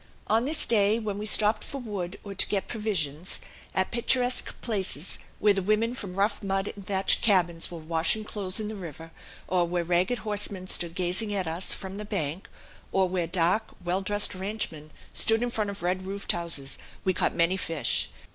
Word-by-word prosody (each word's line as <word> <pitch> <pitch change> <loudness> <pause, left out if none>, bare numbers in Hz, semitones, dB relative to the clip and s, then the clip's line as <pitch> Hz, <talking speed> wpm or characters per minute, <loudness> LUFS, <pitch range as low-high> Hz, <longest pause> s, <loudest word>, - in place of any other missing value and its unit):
On 225 +3 +2
this 305 +3 +2
day, 210 -1 +4
when 210 -3 -4
we 210 - -2
stopped 210 +1 +5
for 280 - -5
wood 200 -6 -5
or 200 - -7
to 190 - +4
get 200 -2 -1
provisions 185 -7 -2 0.4
at 190 - +1
picturesque 245 +1 +2
places, 195 - -1 0.2
where 210 -1 +4
the 195 - -1
women 215 +4 +1
from 200 -8 -7
rough 200 +3 0
mud 195 -1 -2
and 200 -2 -12
thatched 195 -1 +3
cabins 175 -5 +2
were 170 - -8
washing 165 +6 0
clothes 200 -2 -2
in 215 - -3
the 215 - -5
river, 165 -3 -9 0.4
or 175 -1 +1
where 175 0 -1
ragged 180 +7 +1
horsemen 205 -4 0
stood 170 -2 +1
gazing 185 +4 0
at 190 -2 0
us 165 +4 +3
from 190 0 -7
the 210 - -5
bank, 185 -5 -3 0.4
or 190 -1 +2
where 180 -2 -2
dark, 180 +5 0
well 180 +2 0
dressed 205 +2 +3
ranchmen 185 -6 -4 0.2
stood 225 +1 +3
in 245 - -2
front 215 -3 -1
of 200 -2 -6
red 180 +1 0
roofed 195 +2 -2
houses 165 -5 +3 0.2
we 185 - +1
caught - - 0
many 170 +2 +2
fish. 155 - 0
195 Hz, 190 wpm, -27 LUFS, 175-210 Hz, 0.4 s, stopped